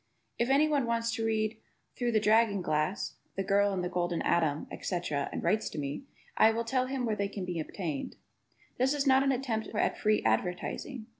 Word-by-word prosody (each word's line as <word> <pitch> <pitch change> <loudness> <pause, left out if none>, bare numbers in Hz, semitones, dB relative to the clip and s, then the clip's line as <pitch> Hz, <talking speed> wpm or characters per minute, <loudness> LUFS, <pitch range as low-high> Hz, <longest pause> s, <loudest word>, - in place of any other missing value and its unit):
If 235 +2 +1
anyone 285 -2 +3
wants 230 0 0
to 225 0 -2
read 220 0 0 0.4
"Through 240 -1 -1
the 215 - +4
Dragon 210 -2 +3
Glass," 155 +4 -1 0.2
"The 195 - -1
Girl 200 +1 +3
in 185 -2 -2
the - - 0
Golden 175 -1 -1
Atom," 155 -3 +1
etc, 165 -6 -2
and - - -4
writes 215 +1 +1
to - - -9
me, 145 - -4 0.3
I 220 - +6
will 225 +1 0
tell 255 +2 0
him 260 -1 -2
where 220 -2 0
they 200 -1 -1
can 195 -2 -5
be 175 -2 -3
obtained. 155 -2 -4 0.6
(This 265 +3 +3
is 285 -1 0
not 265 -1 +5
an 275 0 +2
attempt 245 -4 -2
at - - +1
free 215 0 +2
advertising.) 180 - -1
215 Hz, 200 wpm, -30 LUFS, 180-240 Hz, 0.6 s, I